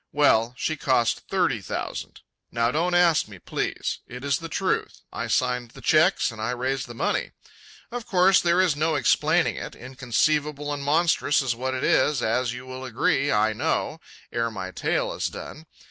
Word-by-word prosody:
Well, 125 -5 +3
she 155 - -2
cost 130 -6 +1
thirty - - +1
thousand. - - -5 0.3
Now 115 0 +1
don't 175 +5 0
ask 175 -7 +4
me, 100 -3 -11
please. - - -3
It 125 +1 -9
is 140 -1 +1
the 165 - -7
truth. - - -2
I - - -3
signed 125 -2 0
the - - -14
cheques - - +3
and 110 -2 -9
I 110 - -1
raised 130 +1 -2
the 120 - -9
money. 195 - -1 0.6
Of 240 -1 -5
course 185 0 +5
there 170 +1 +2
is 185 -6 +3
no 155 +2 +1
explaining 145 - +2
it, - - -6
inconceivable 145 +4 -1
and 145 - -4
monstrous 145 -1 +2
is 125 -3 0
what 130 +2 -2
it 130 - -3
is, 145 -4 +2
as 120 +2 +1
you 125 +1 -8
will 130 0 -8
agree, 130 +3 +1
I 110 +1 +2
know, - - -1 0.3
ere 115 0 0
my 95 -4 -6
tale - - -1
is - - -2
done. 160 +1 -9
130 Hz, 180 wpm, -25 LUFS, 120-155 Hz, 0.6 s, course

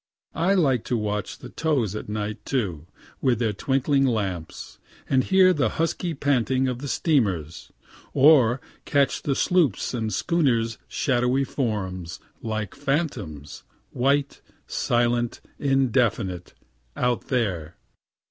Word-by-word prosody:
I 185 +4 +2
like 135 - +2
to 120 - 0
watch 105 -1 -3
the 125 - -10
tows 130 - 0
at 105 - -6
night, 105 0 -4
too, 90 - -2 0.3
with 125 -4 +2
their 110 -2 0
twinkling 135 +5 +1
lamps, 100 -10 -3 0.3
and 130 -1 +3
hear 190 +2 +5
the 145 -5 +1
husky 165 +1 -1
panting 130 -2 +1
of 125 -1 -2
the 145 - -5
steamers; 100 - 0 0.4
or 135 -4 +5 0.2
catch 140 -1 +1
the 140 - 0
sloops' 165 - +1
and 110 -3 -2
schooners' 120 -10 +1
shadowy 125 0 +1
forms, 95 - -3 0.2
like 110 -3 -3
phantoms, 105 - -3 0.3
white, 140 +2 0 0.2
silent, 120 0 0 0.2
indefinite, 120 -9 0 0.4
out 125 -1 0
there. 90 - -2
125 Hz, 120 wpm, -24 LUFS, 105-140 Hz, 0.4 s, hear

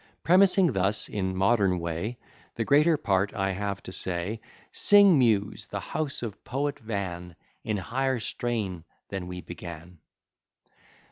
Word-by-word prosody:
Premising 185 0 +5
thus, 95 +2 +2
in 95 -2 -2
modern 95 -1 +2
way, 85 +8 -4 0.4
The 115 - -2
greater 150 +4 +4
part 100 -6 0
I 95 -1 0
have 100 0 -4
to - - -8
say; 95 +5 -3 0.3
Sing, 200 -6 +6
Muse, 110 -5 +1
the - - -4
house 150 -5 -3
of 105 -4 -6
Poet 140 +2 -2
Van, 90 -6 -5 0.3
In 105 -1 -1
higher 130 +6 -1
strain 105 -6 -3 0.3
than 95 -2 -5
we 90 0 -6
began. 85 0 -10
100 Hz, 135 wpm, -27 LUFS, 95-125 Hz, 0.4 s, Sing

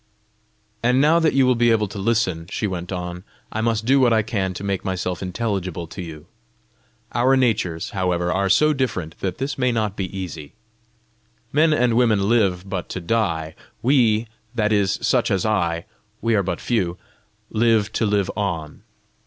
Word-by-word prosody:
"And 125 +2 +3
now 155 +4 +5
that 160 -2 +2
you 135 -1 +5
will 125 - +4
be 120 0 +3
able 110 -2 +2
to 100 - -7
listen," 95 -6 0
she 105 - -2
went 90 -2 -4
on, 90 -1 -5 0.3
"I 110 - -2
must 110 -1 0
do 135 +3 +4
what 125 -2 +4
I 110 -1 +3
can 100 -4 -1
to 95 - -6
make 100 -2 -2
myself 90 -1 -3
intelligible 95 -3 -3
to 85 +3 -8
you. 80 -3 -9 0.9
Our 130 +3 +3
natures, 105 -10 0
however, 90 -2 0
are 95 +1 +1
so 150 +10 +4
different, 105 - -3
that 95 -2 -3
this 135 +1 -3
may 125 -1 +2
not 110 -4 -1
be 95 - -2
easy. 80 -6 -6 1.0
Men 155 +3 +4
and 125 -6 +2
women 110 -5 +3
live 100 -5 +2
but 95 -2 -4
to - - -4
die; 85 -5 -1 0.3
we, 120 -4 +3 0.3
that 110 -2 +1
is 100 -2 +2
such - - +2
as 95 0 0
I 85 -6 0 0.3
we 115 0 0
are 105 - +3
but 90 -2 -2
a - - -14
few 95 -7 0 0.5
live 110 -2 +2
to 110 - +1
live 100 -2 +1
on. 85 -7 -3
100 Hz, 180 wpm, -22 LUFS, 90-115 Hz, 1.0 s, now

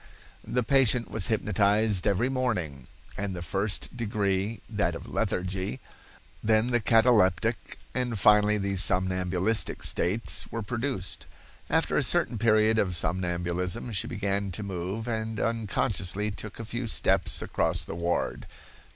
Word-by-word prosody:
"The 125 - -1
patient 125 -2 +3
was 105 -4 -1
hypnotized 105 -1 +2
every 105 +5 +2
morning, 90 - -2 0.3
and 100 -2 -3
the 85 - -5
first 100 +7 -2
degree 105 -2 -1
(that - - -1
of - - -8
lethargy), 95 -5 -2 0.6
then 110 +2 +2
the 120 - +3
cataleptic, 110 -2 +2 0.2
and 125 -3 -2
finally 105 +1 +5
the 100 -1 -2
somnambulistic 95 +2 0
states 105 +6 +2
were 115 -1 -3
produced. 115 -3 -3 0.4
After - - +1
a - - +1
certain 115 - +2
period 110 0 +3
of 90 -3 +1
somnambulism 90 +4 -1
she 100 -5 -2
began 100 -1 -2
to 105 - -2
move, 95 +4 -4
and 110 -2 -3
unconsciously 105 -3 -1
took 105 +2 -8
a 115 - -5
few 120 +2 -4
steps - - +2
across - - 0
the - - -6
ward. 85 +1 -2
105 Hz, 135 wpm, -27 LUFS, 95-115 Hz, 0.6 s, finally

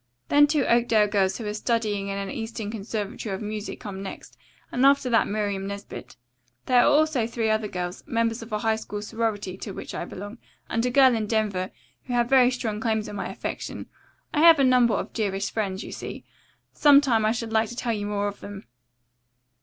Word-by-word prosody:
"Then 290 0 +6
two 290 -2 +1
Oakdale 235 -2 +3
girls 195 -2 +1
who 230 - -6
are 210 - -2
studying 210 -3 -1
in 200 0 -3
an 195 -1 -4
eastern 225 -2 -5
conservatory 210 -1 -4
of - - -6
music 210 0 -5
come 195 -2 -7
next, 195 - -8 0.4
and 250 - 0
after 275 -2 +4
that 230 - +3
Miriam 200 -2 -2
Nesbit. 200 0 -8 0.5
There 250 -1 +4
are - - +4
also 295 -6 +2
three 230 -2 -1
other 215 0 0
girls, 180 -1 -5
members 230 -3 0
of 225 - -10
a 210 - 0
high 220 +1 +1
school 210 -1 -6
sorority 210 -4 -3
to 200 0 -7
which - - -7
I - - -4
belong, 205 +5 -8 0.3
and 230 - -1
a - - +1
girl 260 0 +6
in 220 -2 -1
Denver, 205 -4 0 0.4
who 250 - -4
have 240 -1 +2
very 260 -2 +6
strong 230 -4 -3
claims 220 -1 -1
on - - -7
my - - -4
affection. - - -5 0.5
I 295 - +1
have 330 0 +8
a 275 - +3
number 250 -3 +4
of - - -4
dearest 200 -3 -2
friends, 195 -4 -2
you - - -8
see. - - -7 0.5
Some 290 -2 +7
time 240 -6 +2
I 215 - +3
should 230 -1 -4
like 220 -1 +2
to 240 - -8
tell 235 -1 -1
you 205 -1 -3
more 205 0 -1
of 205 - -6
them." 200 -1 -9
220 Hz, 210 wpm, -25 LUFS, 205-240 Hz, 0.5 s, have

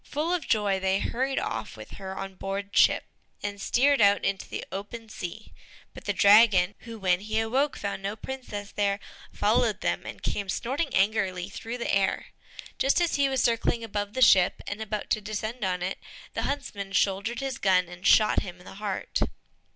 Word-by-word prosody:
Full 310 +4 -2
of 360 - -2
joy, 205 -3 +2
they 190 0 +1
hurried 265 +5 -1
off - - -3
with - - -10
her 190 -1 -7
on 195 0 -5
board 195 +2 -5
ship, - - +5 0.4
and 205 -1 -4
steered 275 +1 +3
out 200 0 +4
into 195 -1 -2
the - - -5
open 220 +3 -7
sea; 215 +2 -7 0.4
but - - -12
the - - +1
dragon, 205 -3 +6
who 230 -2 -9
when 185 -3 +2
he 215 +2 -1
awoke 260 +6 +1
had - - -10
found 200 -1 -3
no 200 +2 -3
princess 220 -4 -7
there, 200 -1 0 0.3
followed - - +1
them, - - -1
and - - -8
came 200 -2 -2
snorting 275 - -1
angrily 190 -2 +1
through 230 +4 -6
the 235 - -2
air. 195 -1 +1 0.5
Just 270 +5 +3
as 345 -2 +1
he 280 -1 +3
was 265 -2 +1
circling 230 0 +1
above 205 -2 -3
the 260 - +3
ship, 185 -6 +5
and 205 +2 -5
about 215 -1 -4
to 215 - +2
descend 215 +3 -4
on 180 -1 -1
it, 185 +2 -3 0.3
the - - -2
huntsman 200 -8 -4
shouldered 200 +4 +1
his 270 -1 -3
gun, 185 -2 +3
and 180 +1 -4
shot 215 -1 +5
him 180 -1 -8
to 180 - -16
the - - -11
heart. 200 -3 -2
205 Hz, 195 wpm, -27 LUFS, 195-235 Hz, 0.5 s, dragon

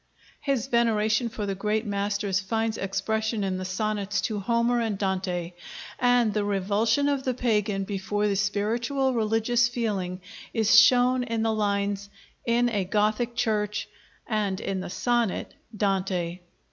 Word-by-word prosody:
His 275 -4 -1
veneration 230 -2 +2
for 220 -2 -4
the 200 - -1
great 210 +3 -1
masters 200 -1 -1
finds 220 +2 -1
expression 215 +3 -1
in 185 -1 -1
the 185 - -4
sonnets 205 +1 -1
to 215 -2 -2
Homer 235 +3 +1
and 220 -3 -1
Dante, 185 -3 -2 0.5
and 245 -3 +3
the 210 - 0
revulsion 205 +7 +1
of 280 -2 +1
the 255 -2 -1
pagan 210 -5 0
before 205 +1 -1
the 200 - +1
spiritual 230 +7 0
religious 225 +1 +2
feeling 205 -7 -2 0.4
is 220 -2 +7
shown 250 0 +4
in 230 -2 -2
the 225 0 +1
lines 200 -1 -1 0.4
'In 240 +1 +3
a 205 -4 0
Gothic 215 +5 0
Church' 210 -2 -1 0.4
and 205 -4 -1
in 195 -1 -3
the 185 - -5
sonnet 240 0 0 0.2
'Dante.' 185 -3 -1
215 Hz, 145 wpm, -26 LUFS, 195-235 Hz, 0.5 s, is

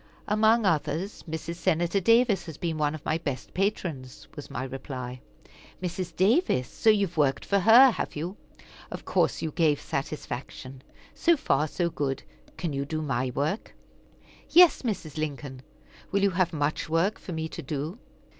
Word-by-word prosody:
"Among 220 +2 +3
others, 160 +3 -1
Mrs. 160 +1 -5
Senator 175 +2 +1
Davis 230 0 +3
has 160 - -7
been 165 -3 -3
one 150 0 +1
of 155 - -11
my 155 +1 0
best 140 -5 -5
patrons," 175 - -3
was 145 - -8
my - - -4
reply. 130 -1 -6 0.6
"Mrs. 180 -1 -4
Davis! 195 - +2
So 225 - +1
you 205 -2 +4
have 175 -2 -10
worked 140 -3 +2
for 200 - +2
her, 235 +6 +8
have - - -4
you? 170 +6 -4 0.5
Of - - -8
course - - +1
you 160 - -2
gave 155 -3 +2
satisfaction; 135 -2 -5 0.3
so 340 -1 +3
far, 155 - +1
good. 150 -5 -2 0.3
Can 170 -5 -3
you 140 0 -1
do 155 +2 -3
my 130 -3 -1
work?" 155 +10 -2 0.7
"Yes, 350 -2 +7
Mrs. 175 - -4
Lincoln. 140 -3 -4 0.5
Will 200 0 +1
you 200 - +4
have 180 -1 +1
much 150 -1 -1
work 165 +6 +1
for 180 - -7
me 160 0 -3
to - - -7
do?" 155 - -4
165 Hz, 165 wpm, -27 LUFS, 145-195 Hz, 0.7 s, her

